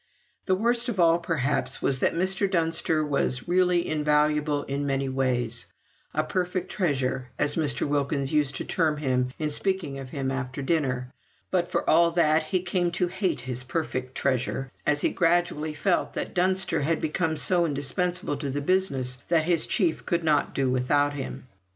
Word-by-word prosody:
The 190 Hz, -, +3 dB
worst 235 Hz, +4 st, +1 dB
of 205 Hz, -5 st, -3 dB
all, 170 Hz, 0 st, +5 dB
perhaps, 150 Hz, -5 st, -1 dB
was, 135 Hz, -2 st, +2 dB
that -, -, +2 dB
Mr. 190 Hz, +3 st, +1 dB
Dunster 165 Hz, -3 st, +1 dB
was 140 Hz, -2 st, 0 dB
really 180 Hz, -1 st, +2 dB
invaluable 150 Hz, -1 st, +1 dB
in 140 Hz, +1 st, -3 dB
many 135 Hz, 0 st, 0 dB
ways; 125 Hz, -3 st, -1 dB, 0.4 s
"a -, -, 0 dB
perfect 180 Hz, 0 st, -2 dB
treasure," 130 Hz, -8 st, -1 dB
as 145 Hz, -, +2 dB
Mr. 150 Hz, -4 st, 0 dB
Wilkins 140 Hz, -1 st, -1 dB
used 145 Hz, -3 st, +1 dB
to -, -, -4 dB
term 155 Hz, -3 st, +1 dB
him 125 Hz, -3 st, 0 dB
in 155 Hz, -1 st, -2 dB
speaking 180 Hz, -5 st, -1 dB
of 135 Hz, -1 st, -8 dB
him 135 Hz, -1 st, -3 dB
after 135 Hz, 0 st, -4 dB
dinner; 130 Hz, -5 st, -1 dB, 0.4 s
but, 175 Hz, -2 st, +1 dB
for -, -, -1 dB
all 170 Hz, 0 st, +5 dB
that, 160 Hz, -2 st, +3 dB
he 180 Hz, +3 st, -1 dB
came 175 Hz, -1 st, 0 dB
to 180 Hz, 0 st, 0 dB
hate 185 Hz, -, -1 dB
his 125 Hz, 0 st, -5 dB
"perfect 130 Hz, -2 st, -3 dB
treasure," 135 Hz, 0 st, -1 dB, 0.2 s
as 150 Hz, 0 st, +2 dB
he -, -, +2 dB
gradually 165 Hz, -3 st, +1 dB
felt 175 Hz, +5 st, 0 dB
that -, -, -4 dB
Dunster 185 Hz, -2 st, +1 dB
had 160 Hz, +3 st, +1 dB
become 160 Hz, 0 st, -1 dB
so 175 Hz, +3 st, +3 dB
indispensable 150 Hz, +3 st, -2 dB
to 140 Hz, -, -4 dB
the 140 Hz, +2 st, -2 dB
business 140 Hz, -7 st, 0 dB
that 165 Hz, -2 st, +3 dB
his 170 Hz, -1 st, +1 dB
chief 175 Hz, -7 st, 0 dB
could 170 Hz, -1 st, 0 dB
not 150 Hz, -2 st, +1 dB
do 135 Hz, -1 st, +1 dB
without 145 Hz, +3 st, +2 dB
him. 135 Hz, -2 st, -6 dB
150 Hz, 175 wpm, -26 LUFS, 135-175 Hz, 0.4 s, all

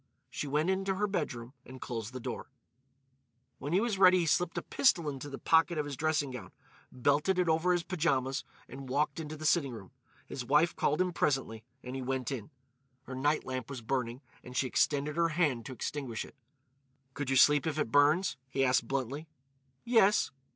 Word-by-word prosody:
She 150 Hz, -, -4 dB
went 150 Hz, +6 st, +1 dB
into 195 Hz, 0 st, -1 dB
her 205 Hz, +2 st, 0 dB
bedroom 140 Hz, -, -3 dB
and 130 Hz, 0 st, -11 dB
closed 115 Hz, -3 st, -5 dB
the 130 Hz, -, -6 dB
door. 125 Hz, 0 st, -6 dB, 1.1 s
When 145 Hz, -, -5 dB
he 180 Hz, -, +4 dB
was 215 Hz, -3 st, -1 dB
ready 185 Hz, -1 st, +7 dB
he -, -, 0 dB
slipped 170 Hz, +2 st, +1 dB
a -, -, -2 dB
pistol 175 Hz, -, +2 dB
into 145 Hz, 0 st, -5 dB
the 135 Hz, -, -6 dB
pocket 165 Hz, +1 st, +3 dB
of 150 Hz, -, 0 dB
his 145 Hz, -1 st, -5 dB
dressing 150 Hz, -1 st, 0 dB
gown, 125 Hz, -2 st, -8 dB, 0.4 s
belted 145 Hz, +8 st, +1 dB
it 180 Hz, -1 st, +2 dB
over 165 Hz, +3 st, +2 dB
his 175 Hz, -1 st, +1 dB
pyjamas, 150 Hz, -7 st, 0 dB, 0.2 s
and 135 Hz, 0 st, -9 dB
walked 145 Hz, +5 st, 0 dB
into 155 Hz, -1 st, -6 dB
the 155 Hz, -, -7 dB
sitting 155 Hz, -5 st, +2 dB
room. 100 Hz, -5 st, -10 dB, 0.3 s
His 130 Hz, -, -6 dB
wife 150 Hz, +7 st, +3 dB
called 150 Hz, +5 st, +1 dB
him 180 Hz, -1 st, 0 dB
presently, 130 Hz, -8 st, -1 dB, 0.2 s
and 125 Hz, +1 st, -6 dB
he 135 Hz, -, -3 dB
went 130 Hz, 0 st, -2 dB
in. 120 Hz, -6 st, -5 dB, 0.5 s
Her 130 Hz, -, -8 dB
night 145 Hz, +4 st, 0 dB
lamp 130 Hz, -1 st, -4 dB
was 130 Hz, -4 st, -7 dB
burning 125 Hz, 0 st, -2 dB, 0.2 s
and 125 Hz, 0 st, -8 dB
she -, -, +2 dB
extended 145 Hz, +3 st, 0 dB
her 170 Hz, 0 st, +3 dB
hand 150 Hz, -8 st, 0 dB
to -, -, -7 dB
extinguish 130 Hz, -3 st, -4 dB
it. -, -, -16 dB, 0.8 s
"Could 140 Hz, 0 st, -4 dB
you 135 Hz, -, +2 dB
sleep 145 Hz, +3 st, +5 dB
if 155 Hz, -1 st, -2 dB
it 150 Hz, -7 st, -1 dB
burns?" 150 Hz, +7 st, +3 dB
he 135 Hz, 0 st, +1 dB
asked 125 Hz, -2 st, +2 dB
bluntly. 135 Hz, +4 st, -3 dB, 0.6 s
"Yes." 225 Hz, -4 st, +4 dB
145 Hz, 195 wpm, -31 LUFS, 130-165 Hz, 1.1 s, ready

